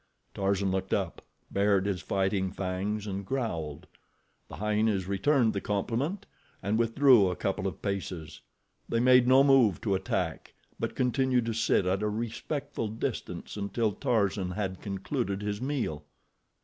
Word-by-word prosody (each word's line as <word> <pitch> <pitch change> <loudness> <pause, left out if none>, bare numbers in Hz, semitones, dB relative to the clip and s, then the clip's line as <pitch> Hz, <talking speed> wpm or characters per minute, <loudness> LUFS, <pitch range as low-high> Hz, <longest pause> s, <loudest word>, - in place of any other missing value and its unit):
Tarzan 100 -1 0
looked 95 0 0
up, - - -3 0.3
bared 100 -1 +2
his 100 -3 -1
fighting 95 -1 0
fangs 100 +2 -3
and 100 -1 -4
growled. 90 - -3 0.6
The - - -9
hyenas 105 -2 +1
returned 115 +4 +2
the 100 - -2
compliment, 120 - -2 0.4
and 105 +4 +1
withdrew 115 -3 +5
a 90 - -2
couple 95 +1 -1
of 95 - -6
paces. 95 -5 -4 0.5
They 115 - +1
made 125 0 +6
no 130 +2 +7
move 135 -8 +5
to 105 -4 0
attack; 95 -3 -2 0.2
but - - -3
continued 125 -1 +2
to 115 - -1
sit 110 -4 +2
at 95 +2 +1
a 105 - +1
respectful 120 +4 -3
distance 110 +2 -4
until 105 +2 0
Tarzan 100 -6 0
had 95 0 -3
concluded 100 +1 -3
his 105 +1 -3
meal. 125 - -2
105 Hz, 145 wpm, -29 LUFS, 95-120 Hz, 0.6 s, no